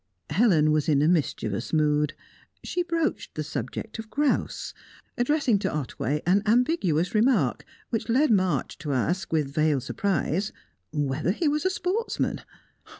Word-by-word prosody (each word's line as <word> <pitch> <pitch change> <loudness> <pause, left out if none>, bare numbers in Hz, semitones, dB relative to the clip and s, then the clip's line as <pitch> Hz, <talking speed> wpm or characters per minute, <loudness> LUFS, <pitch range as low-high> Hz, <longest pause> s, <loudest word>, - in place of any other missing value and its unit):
Helen 175 -9 +4
was 155 0 +1
in 145 -1 +3
a - - +4
mischievous 120 - 0
mood. 150 -1 +2 0.5
She 360 - -1
broached 335 -2 -2
the 155 - -2
subject 150 - -5
of 225 0 -7
grouse, 290 +2 -1 0.4
addressing 245 -4 +2
to - - -1
Otway 150 0 -2
an 190 +4 +4
ambiguous 215 - +2
remark 215 - +2 0.3
which 225 0 -2
led 275 +5 +3
March 185 -8 +1
to 150 -3 -3
ask, 165 +7 -1
with 150 -4 0
veiled 155 -4 +2
surprise, 195 -1 -1 0.4
whether 145 0 -1
he 265 - +1
was 300 +2 0
a - - +4
sportsman. 380 +5 -1
180 Hz, 145 wpm, -26 LUFS, 150-245 Hz, 0.5 s, Helen